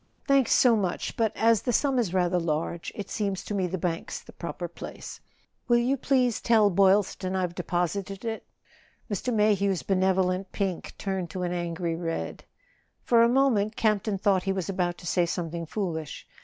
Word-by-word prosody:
"Thanks 275 -3 +3
so 245 -3 +5
much; 190 -5 -2
but 225 -2 +1
as 225 -2 +4
the 245 - -1
sum 270 +2 +2
is 215 -8 0
rather 180 -1 +2
large 165 +1 -2
it 200 -2 -5
seems 200 -3 -2
to - - -5
me 190 -3 0
the 185 +2 -3
bank's 170 -1 -3
the - - -14
proper 175 0 -5
place. 170 - -9 0.5
Will 240 -1 +5
you 245 +3 +2
please 255 -3 +1
tell 220 -3 +4
Boylston 190 0 +2
I've 180 -2 -1
deposited 185 +4 -2
it? 225 -1 -3 0.4
" - - -23
Mr. 225 +5 -1
Mayhew's 200 -4 +2
benevolent 185 0 +1
pink 190 -4 -3
turned 190 -3 -3
to 180 +3 -4
an 175 - -1
angry 170 -1 -2
red. 165 -1 -4 0.6
For 235 -1 +4
a 235 - +5
moment 235 -5 +2
Camp 215 -3 +2
ton 205 -1 -2
thought 195 -1 +2
he 195 - -1
was 190 -2 -2
about 180 -2 -1
to - - -12
say 175 0 +1
something 170 -1 -4
foolish. 160 -6 -4
190 Hz, 185 wpm, -27 LUFS, 175-215 Hz, 0.6 s, so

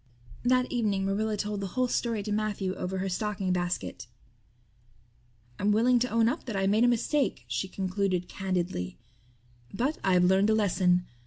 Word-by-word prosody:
That 255 +1 +2
evening 210 -5 0
Marilla 210 +2 0
told 205 0 -3
the 195 - -2
whole 255 0 +3
story 230 -3 -1
to 210 - -4
Matthew 205 -3 -1
over 190 0 -4
her 190 +1 -2
stocking 195 -1 -1
basket. 175 -8 -3 1.5
"I'm 205 +1 +2
willing 240 +4 +4
to 250 +2 0
own 230 0 +3
up 280 +8 -2
that 230 -5 -4
I 195 0 +1
made 210 +4 +3
a - - +5
mistake," 245 - 0
she 120 +9 -2
concluded 185 -1 -1
candidly, 180 - -3 0.7
"but 260 +9 -1
I've 180 -2 +4
learned 190 +3 +4
a 220 - +4
lesson. 180 -4 +2
200 Hz, 165 wpm, -28 LUFS, 185-225 Hz, 1.5 s, a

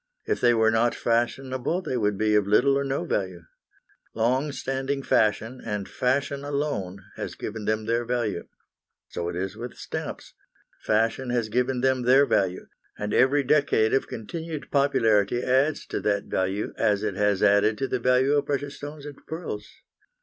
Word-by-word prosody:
If - - -1
they 120 -1 +5
were 110 0 +4
not 115 +2 +2
fashionable 130 +7 -1
they 130 - -3
would 105 -4 0
be 110 0 +1
of 105 -2 +3
little 130 +7 +4
or 140 - +1
no 135 0 -2
value. 95 -3 -2 0.7
Long 130 +6 +1
standing 135 0 -3
fashion, 110 +3 +1
and 105 -3 -3
fashion 140 +2 -1
alone, 140 -10 -3
has - - -5
given 110 -1 -6
them 110 0 0
their 115 +2 0
value. 120 -6 -2 0.6
So 85 0 -3
it - - -5
is 95 +2 -3
with 120 0 -7
stamps; - - -6 0.5
fashion 115 +4 0
has 120 -3 0
given 125 +2 0
them 130 0 +2
their 130 +3 +5
value, 95 -7 0 0.3
and 105 0 -3
every 140 +2 +4
decade 135 -6 +2
of 135 - +1
continued 155 +7 -6
popularity 120 -5 +2
adds 135 +4 +1
to - - -2
that 100 -1 0
value 95 +2 -2
as 105 0 +1
it 105 -2 -1
has 105 0 +1
added 100 +2 +4
to 135 - -1
the 130 - -1
value 125 +3 +3
of 145 -1 +1
precious 140 0 -2
stones 145 0 -8
and 145 -2 -8
pearls. 155 -11 -6
120 Hz, 170 wpm, -25 LUFS, 105-135 Hz, 0.7 s, they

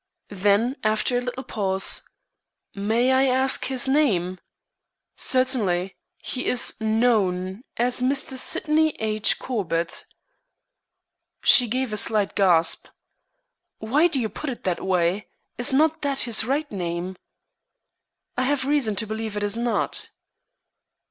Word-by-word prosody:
Then, 205 +6 +1
after 215 +3 +1
a 245 - +1
little 250 +1 -5
pause: 195 -5 0 0.7
"May 225 +5 +1
I 260 +1 +3
ask 260 +1 +2
his 260 -1 0
name?" 195 - +1 0.8
"Certainly. 210 -9 +1 0.2
He 255 - -4
is 250 - +2
known 215 -4 0 0.2
as 245 +1 +1
Mr. 265 +1 0
Sydney 310 +4 +2
H. 215 -1 +1
Corbett." 170 -9 -2 1.4
She 245 - +6
gave 250 0 -2
a - - -2
slight 210 -2 +1
gasp. 170 -4 +2 0.9
"Why 280 +10 +2
do 295 -6 -2
you 230 - -1
put 275 +8 -6
it 250 - -5
in - - -39
that 180 -2 -2
way? 185 +1 0 0.3
Is 245 +4 +2
not 310 +4 +2
that 280 -2 -1
his 225 -2 +2
right 290 +4 -2
name?" 180 -1 -4 1.2
"I 250 - -1
have 270 -1 0
reason 275 -7 +1
to 220 - 0
believe 220 0 -5
it 205 - -2
is 205 +1 +1
not." 235 0 -2
225 Hz, 130 wpm, -23 LUFS, 200-260 Hz, 1.4 s, She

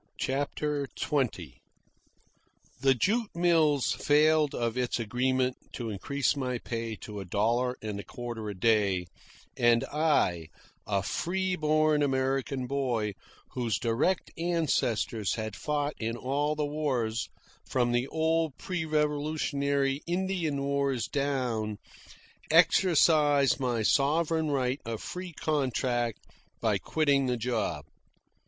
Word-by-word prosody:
CHAPTER 145 +1 -1
XX 95 - -1 1.2
The 135 +1 +4
jute 215 - 0
mills 160 -5 +3
failed 150 0 +3
of 115 -1 -1
its 125 -1 -1
agreement 125 +3 0 0.2
to 115 -3 -4
increase 140 +8 0
my 130 -3 -2
pay 115 -1 -4
to 105 -1 -7
a 95 - -6
dollar 115 +7 0
and 105 -2 -4
a - - -6
quarter 120 -3 -6
a 100 - -5
day, 100 -5 +2 0.5
and 120 -1 +4
I, 145 - +2 0.4
a 100 -2 0
free 185 - -1
born 155 -1 +2
American 135 -1 0
boy 125 -6 -1 0.4
whose 120 -4 -1
direct 120 +11 0
ancestors 140 - 0
had 110 -2 -4
fought 150 +2 -1
in 115 +1 -2
all 145 +4 -1
the 150 -1 -1
wars 130 -7 -1 0.4
from 120 -2 +1
the 120 +2 +1
old 160 -2 0
pre 180 -4 -3
Revolutionary 145 -2 0
Indian 175 -5 -1
wars 140 -4 0
down, 125 -7 -1 0.7
exercised 155 -4 +4
my 120 -4 0
sovereign 155 +5 +2
right 130 -1 0
of 115 -1 -4
free 180 -1 -6
contract 130 -6 -1 0.3
by - - +1
quitting 140 -4 +1
the 125 -1 0
job. 110 -11 -2
135 Hz, 120 wpm, -29 LUFS, 115-150 Hz, 1.2 s, The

